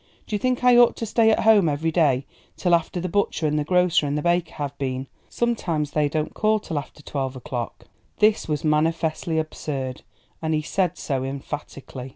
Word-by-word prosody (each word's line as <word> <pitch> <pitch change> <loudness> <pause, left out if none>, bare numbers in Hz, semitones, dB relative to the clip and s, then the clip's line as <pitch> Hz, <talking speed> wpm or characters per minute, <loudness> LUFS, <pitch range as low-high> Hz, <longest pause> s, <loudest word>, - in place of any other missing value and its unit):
Do - - -9
you 210 - +1
think 255 +2 0
I 250 -1 +6
ought 240 -1 +6
to 230 - -4
stay 220 +1 +3
at 220 - +3
home 210 -6 +5
every 155 +3 -1
day 140 -6 +2 0.3
till 175 -2 +1
after 170 +1 +1
the 180 - -2
butcher 185 -3 0
and 150 0 +1
grocer 180 -1 +2
and 145 +1 -1
baker 175 -1 +1
have 145 -1 -4
been 130 -2 -2
here? 135 - -9 0.2
Sometimes 170 -11 -1
they 150 -1 +1
don't 155 0 -2
call 215 0 +2
till 160 -7 -3
after 145 +1 -11
twelve 135 -2 -3
o'clock." 120 -2 -5 0.3
This 215 0 +3
was 150 -2 -2
manifestly 160 +1 0
absurd, 140 -4 -3 0.4
and 160 -1 0
he 155 - -1
said 180 +1 0
so 135 -3 -2
emphatically. 135 -1 -6
155 Hz, 190 wpm, -24 LUFS, 145-180 Hz, 0.4 s, I